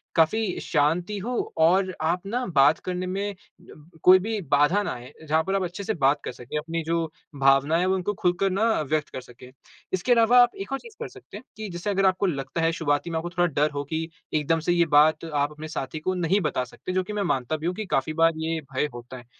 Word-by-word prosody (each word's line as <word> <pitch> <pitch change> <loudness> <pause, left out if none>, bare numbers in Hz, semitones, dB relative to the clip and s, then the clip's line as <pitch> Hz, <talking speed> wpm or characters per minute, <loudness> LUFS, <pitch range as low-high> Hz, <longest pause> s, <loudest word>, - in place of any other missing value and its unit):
काफ़ी 185 +5 +2
शांति 170 +7 0
हो 245 +5 -3 0.3
और 185 +2 +3
आप 170 +4 0
ना 245 +5 -2
बात 140 +3 +5
करने 180 0 -2
में 200 +2 -3 0.3
ब 155 -4 -16 0.2
कोई 185 +1 +8
भी 220 +2 -3
बाधा 150 +8 +4
ना - - -3
आये। 125 +3 -10
जहाँ 160 +2 +2
पर 195 +3 -1
आप 195 - +1
अच्छे 180 +3 -5
से 220 - -1
बात 145 -3 +2
कर - - -3
सकें, 125 +4 -7
अपनी 165 +2 -3
जो 165 +1 0 0.3
भावनाएँ 135 +4 +4
हैं 180 - +1
वो 190 - +2
उनको 190 +2 -2
खुल 180 -2 +1
कर 195 0 +2
ना 195 +4 0 0.2
व्यक्त 150 +1 -1
कर 130 - -7
सकें। 125 +1 -14 0.4
इसके 185 +7 0
अलावा 235 +1 +6
आप 245 - -1
एक 335 - -7
और 270 - -1
चीज़ 465 -2 -14
कर - - -3
सकते - - -12
हैं - - -12
कि 215 -2 -5
जैसे 175 +4 -4
अगर 195 -1 +1
आपको 190 +1 +2
लगता 140 -2 -2
है 165 0 +2
शुरुआती 155 0 -1
में 165 - -2
आपको 170 +2 -3
थोड़ा 175 0 +1
डर 150 +2 +2
हो 145 0 -3
कि 160 +3 -3 0.3
एकदम 155 +2 +1
से 175 +2 0
ये 170 -1 +3
बात 155 +2 +4
आप 145 0 +1
अपने 150 +1 -8
साथी 155 0 -5
को 185 +4 -1
नहीं 180 +2 +1
बता 150 -6 -1
सकते, 125 +8 -8
जो 185 0 +1
कि 210 - -7
मैं 205 -1 -1
मानता 145 -2 -1
भी 155 - -7
हूँ 180 - -1
कि 215 +1 -4
काफ़ी 155 -2 -1
बार 165 +1 +4
ये 160 0 -2
भय 130 - +1
होता 120 +2 -9
है। 120 - -13
165 Hz, 250 wpm, -25 LUFS, 150-190 Hz, 0.4 s, कोई